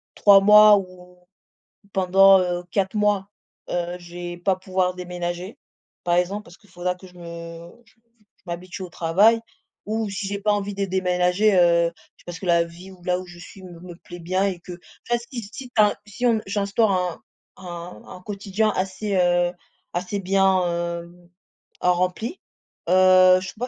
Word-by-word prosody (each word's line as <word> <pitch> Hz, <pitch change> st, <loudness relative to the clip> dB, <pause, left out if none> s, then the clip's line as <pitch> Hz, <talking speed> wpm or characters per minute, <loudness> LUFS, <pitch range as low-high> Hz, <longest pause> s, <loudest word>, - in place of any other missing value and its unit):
3 200 Hz, -1 st, +7 dB
mois 210 Hz, +1 st, +8 dB
ou 180 Hz, -2 st, -9 dB, 0.8 s
pendant 195 Hz, +1 st, +5 dB
heu, 180 Hz, -1 st, -2 dB
4 195 Hz, +3 st, -1 dB
mois, 205 Hz, -2 st, +1 dB, 0.4 s
heu, 175 Hz, 0 st, -2 dB
je 175 Hz, 0 st, -13 dB
vais 175 Hz, 0 st, -6 dB
pas 185 Hz, +2 st, 0 dB
pouvoir 185 Hz, -1 st, -1 dB
déménager, 180 Hz, +2 st, -6 dB, 0.4 s
par 175 Hz, 0 st, +1 dB
exemple, 190 Hz, +4 st, -1 dB
parce 175 Hz, -, -15 dB
qu'il 205 Hz, -, -25 dB
faudra 180 Hz, 0 st, -3 dB
que 180 Hz, -, -15 dB
je 180 Hz, -, -16 dB
me 170 Hz, -1 st, -9 dB, 0.2 s
j -, -, -26 dB, 0.4 s
je -, -, -35 dB
m'habitue 175 Hz, +2 st, -7 dB
au 180 Hz, -, -8 dB
travail, 190 Hz, +8 st, +3 dB, 0.5 s
ou 220 Hz, 0 st, -2 dB
si 195 Hz, 0 st, -4 dB
j'ai 200 Hz, 0 st, -4 dB
pas 210 Hz, +1 st, +2 dB
envie 205 Hz, 0 st, -2 dB
de 200 Hz, 0 st, -1 dB
déménager 185 Hz, +2 st, +1 dB
heu, 170 Hz, -1 st, +4 dB, 0.3 s
parce 175 Hz, -1 st, -7 dB
que -, -, -8 dB
la 170 Hz, -1 st, +4 dB
vie 170 Hz, +3 st, -12 dB
où 180 Hz, -2 st, -17 dB
là 180 Hz, 0 st, 0 dB
où 185 Hz, -, -8 dB
je 175 Hz, -1 st, -13 dB
suis 190 Hz, +2 st, -13 dB
me 175 Hz, -2 st, -11 dB
me 175 Hz, 0 st, -10 dB
plaît 175 Hz, 0 st, -12 dB
bien 185 Hz, +3 st, -1 dB
et 190 Hz, -3 st, -2 dB
qu'enfin 180 Hz, +7 st, -6 dB
si 245 Hz, -3 st, -5 dB
si 235 Hz, +5 st, -10 dB
tu -, -, -57 dB
as 210 Hz, -1 st, +7 dB
un -, -, -7 dB
si 215 Hz, +4 st, -5 dB
on 235 Hz, -2 st, +4 dB
si -, -, -12 dB
j'instaure 200 Hz, +2 st, +1 dB
un 180 Hz, -2 st, -2 dB, 0.4 s
un 175 Hz, -1 st, -9 dB
un 180 Hz, -, -11 dB
quotidien 200 Hz, +2 st, -1 dB
assez 195 Hz, +2 st, -2 dB
heu, 175 Hz, -1 st, +2 dB, 0.4 s
assez 180 Hz, +3 st, -3 dB
bien, 190 Hz, -1 st, +2 dB
heu, 170 Hz, 0 st, -4 dB, 0.7 s
rempli 180 Hz, -, 0 dB, 0.5 s
heu, 185 Hz, 0 st, +6 dB
je 185 Hz, -, -6 dB
crois 245 Hz, +3 st, -5 dB
185 Hz, 180 wpm, -23 LUFS, 175-200 Hz, 0.8 s, mois